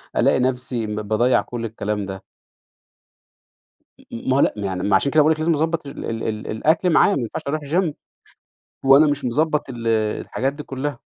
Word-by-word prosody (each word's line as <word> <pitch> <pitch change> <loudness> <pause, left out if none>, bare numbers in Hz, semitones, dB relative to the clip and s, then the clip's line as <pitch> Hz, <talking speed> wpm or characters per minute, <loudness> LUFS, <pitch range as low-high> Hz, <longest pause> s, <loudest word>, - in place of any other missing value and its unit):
ألاقي - - +3
نفْسي 125 -3 -1
م 105 0 -3
باضَيّع 110 +4 +2
كلّ 120 -2 -6
الكلام 105 -2 -3
ده. 95 -1 -7 1.7
م - - -20
م 115 - -5
ما 130 - +3
هو - - +3
لأ - - +3
ما 100 - -3
يعني، 95 -1 -3
ما 100 -1 +3
عشان 140 +8 +2
كده 155 +1 +5
باقول 155 +2 +4
لِك 155 - -9
لازم 165 +2 +1
نضبَّط 160 0 0
ال - - -7
ال 115 -1 -4
ال 110 -1 -4
الأكل 160 +10 +2
معاه، 185 +4 +4
ما 135 - -1
ينفعش 115 - -4
أروح 155 +2 -1
Gym، 155 +2 0 0.9
وأنا 140 +3 +7
مش 145 -2 -1
مضبَّط 150 +4 0
ال 120 -2 -7 0.3
الحاجات 135 +2 -2
دي 150 +1 -8
كُلها. 135 -1 -5
130 Hz, 200 wpm, -21 LUFS, 110-150 Hz, 1.7 s, وأنا